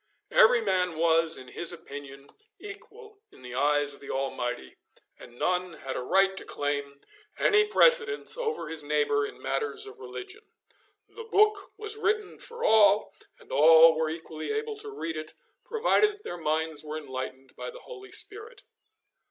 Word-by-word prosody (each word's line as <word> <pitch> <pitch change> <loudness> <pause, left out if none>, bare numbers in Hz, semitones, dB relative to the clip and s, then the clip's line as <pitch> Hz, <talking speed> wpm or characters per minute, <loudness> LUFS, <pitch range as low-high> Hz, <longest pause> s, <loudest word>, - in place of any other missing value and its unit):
Every 235 +2 +6
man 180 -5 0
was, 165 0 +2
in 130 -1 -11
his 170 +6 +1
opinion, 140 -4 -10 0.3
equal 420 +1 -12
in 130 - -18
the 125 -1 -9
eyes 145 +2 +1
of - - -14
the 140 - -12
Almighty, 125 - -4 0.4
and 120 - -14
none 180 +2 -1
had 135 -4 -7
a - - -3
right 195 +9 +2
to - - -4
claim 140 -1 -4 0.4
any 420 0 +4
precedence 455 0 +4
over 460 -2 -3
his 160 -1 -1
neighbour 145 -1 +1
in - - -12
matters 440 -1 -2
of 415 +1 -12
religion. 400 +1 -9 0.7
The 460 - -10
book 430 -2 +2
was 430 0 -6
written 430 -1 -1
for 470 0 -6
all, 210 -1 +4 0.3
and - - -17
all 160 +2 +7
were 160 0 -1
equally 160 - -6
able 440 0 -3
to 425 0 -5
read 165 - -5
it, 155 0 -6 0.3
provided 445 -2 +2
that 415 0 -18
their - - -6
minds 160 -1 0
were 155 0 -5
enlightened 130 -2 -7
by - - -6
the - - -11
Holy 400 -5 -12
Spirit. 440 +3 -6
175 Hz, 165 wpm, -27 LUFS, -, 0.7 s, all